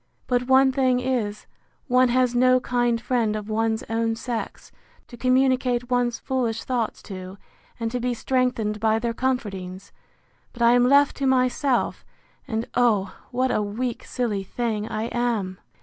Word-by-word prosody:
—But 250 0 0
one 265 0 +5
thing 260 -2 +2
is, 240 -5 -2 0.4
one 255 -1 +4
has 250 0 +2
no 255 +1 +4
kind 240 -2 0
friend 230 -3 0
of 215 0 -5
one's 225 0 0
own 225 0 0
sex, 230 0 -5 0.4
to 240 - -11
communicate 255 -1 +1
one's 245 -1 +1
foolish 235 -4 -2
thoughts 240 -4 -2
to, 185 -1 -8 0.4
and 225 -1 -2
to 250 - -2
be 245 0 -1
strengthened 240 -4 0
by 220 0 +2
their 230 0 -2
comfortings! 195 -8 -3 0.6
But 235 - -2
I 235 - +6
am 245 0 +4
left 280 +1 +4
to 275 - 0
myself; 255 0 +1 0.4
and, 225 -2 -2
oh! 215 -6 +2 0.2
what 255 +1 0
a - - +1
weak 225 +4 -3
silly 220 -6 -2
thing 220 +1 -3
I 215 -1 -2
am! 230 -6 -2
240 Hz, 155 wpm, -24 LUFS, 220-255 Hz, 0.6 s, I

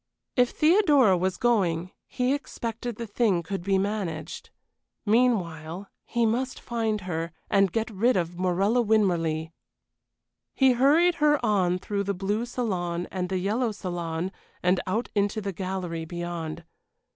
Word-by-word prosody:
If 250 -1 +4
Theodora 305 - +4
was 185 +1 -1
going, 185 -8 +1 0.2
he 250 +1 0
expected 235 -4 -4
the 235 - -5
thing 205 -5 +1
could 195 +3 -4
be 195 0 +2
managed. 190 -6 -3 0.6
Meanwhile, 195 -6 +1 0.2
he 235 -1 0
must 250 +4 -1
find 225 -3 -2
her, 165 -2 -3 0.2
and 195 -2 +4
get 225 +3 -1
rid 220 +3 +2
of 175 -1 -2
Morella 195 +6 +2
Winmarleigh. 170 -8 +1 1.0
He 265 -1 +5
hurried 300 +8 +4
her 295 0 +5
on 185 -4 +2
through 200 +1 -3
the 200 0 -1
blue 205 +5 -1
salon 180 -8 -2
and 180 -1 -3
the 190 - 0
yellow 220 +6 0
salon 175 -3 -4 0.3
and 180 +1 +3
out 220 +6 -1
into 205 +1 +1
the 200 -2 -4
gallery 180 -3 -4
beyond. 170 -1 -5
195 Hz, 140 wpm, -26 LUFS, 175-235 Hz, 1.0 s, He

